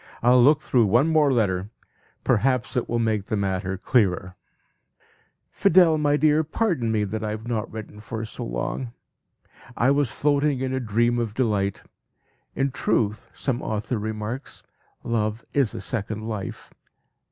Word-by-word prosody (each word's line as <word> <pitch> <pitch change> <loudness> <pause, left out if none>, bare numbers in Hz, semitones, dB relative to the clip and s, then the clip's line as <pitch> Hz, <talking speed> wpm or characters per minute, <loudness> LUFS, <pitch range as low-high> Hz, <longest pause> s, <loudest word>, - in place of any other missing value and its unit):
I'll 125 +1 +6
look 145 +4 +5
through 120 -7 +2
one 120 +10 +3
more 155 -3 +4
letter; 100 -5 0 0.5
perhaps 130 +2 +1
it 125 - -1
will 120 - 0
make 110 -3 0
the 110 - -1
matter 95 -1 -2
clearer. 95 -4 +1 1.2
"Fidel, 165 -3 +4
my 145 -1 +2
dear, 155 +1 +3
pardon 160 - 0
me 110 -1 +1
that 110 +2 -3
I 110 - -2
have 110 +2 -5
not 115 -2 -2
written 110 -1 -8
for 110 +1 -5
so - - -7
long. 115 - -4 0.8
I 130 +4 +3
was 140 -3 +2
floating 145 0 +1
in 130 0 -2
a 130 - 0
dream 120 +1 +1
of 110 -3 -3
delight. 105 -6 0 0.7
In 135 0 0
truth, 110 -4 -1
some 130 -3 -2
author 110 +2 -2
remarks, 110 +4 -5 0.4
'Love 110 -1 -1
is 135 -6 +1
a - - -5
second 110 -1 -4
life.' 105 -4 -6
115 Hz, 150 wpm, -24 LUFS, 105-135 Hz, 1.2 s, I'll